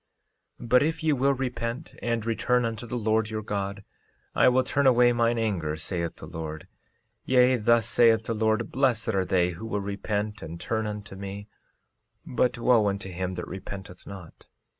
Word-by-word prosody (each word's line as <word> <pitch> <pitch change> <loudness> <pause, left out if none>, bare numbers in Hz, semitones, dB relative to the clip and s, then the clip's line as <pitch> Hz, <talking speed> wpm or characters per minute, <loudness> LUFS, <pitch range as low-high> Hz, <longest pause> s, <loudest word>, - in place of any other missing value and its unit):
13:11 120 - -9
But 125 +1 +6
if 160 +2 -1
ye 155 -1 +3
will 140 +1 +2
repent 125 +1 -4
and 115 -2 -1
return 125 +2 +1
unto 115 +1 -4
the 120 - -3
Lord 110 -1 +1
your 110 -1 -4
God 100 -1 -3 0.5
I - - +5
will 130 +1 +3
turn 140 +2 +1
away 120 -1 +5
mine 120 0 +2
anger, 95 -9 -1
saith 85 +1 -3
the - - -10
Lord; 80 -1 -7 0.6
yea, 130 0 +4
thus 115 -1 +3
saith 115 -2 +4
the 115 - -2
Lord, 110 +1 0
blessed 130 -5 +1
are 95 -4 +1
they 90 -1 +2
who 90 +7 -7
will 105 -2 -1
repent 105 +1 -3
and 85 +1 -7
turn 110 +2 -2
unto 105 -1 -6
me, 100 +1 -7 0.8
but 125 0 0
wo 115 -3 +4
unto 100 -1 -3
him 90 +1 -3
that 90 - -5
repenteth 95 -1 -8
not. 95 -5 -11
110 Hz, 180 wpm, -27 LUFS, 100-120 Hz, 0.8 s, But